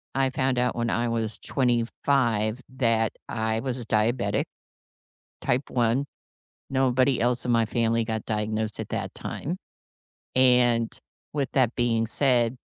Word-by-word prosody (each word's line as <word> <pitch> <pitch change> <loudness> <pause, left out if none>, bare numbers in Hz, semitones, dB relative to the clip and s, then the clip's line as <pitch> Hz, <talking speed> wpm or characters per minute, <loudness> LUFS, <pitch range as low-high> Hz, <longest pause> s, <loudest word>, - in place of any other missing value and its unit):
I 135 -1 +2
found 130 -1 0
out 125 0 +1
when 120 -1 -1
I 120 0 0
was 110 -2 -2
25 120 -2 +1 0.2
that 115 -3 +2 0.2
I 110 0 -1
was 130 -1 -3
a 120 - -7
diabetic. 110 -1 +1 1.0
Type 125 +3 0
1. 120 +3 +1 0.6
Nobody 130 0 +2
else 125 0 +1
in 120 - +1
my 115 -1 +3
family 115 0 +1
got 110 -1 -3
diagnosed 110 0 -2
at - - -5
that - - -3
time. 175 +5 -4 0.8
And, 125 -3 +4 0.4
with 140 -3 -1
that 125 -3 +2
being 115 -2 +1
said, 125 -1 +2
120 Hz, 135 wpm, -26 LUFS, 115-130 Hz, 1.0 s, And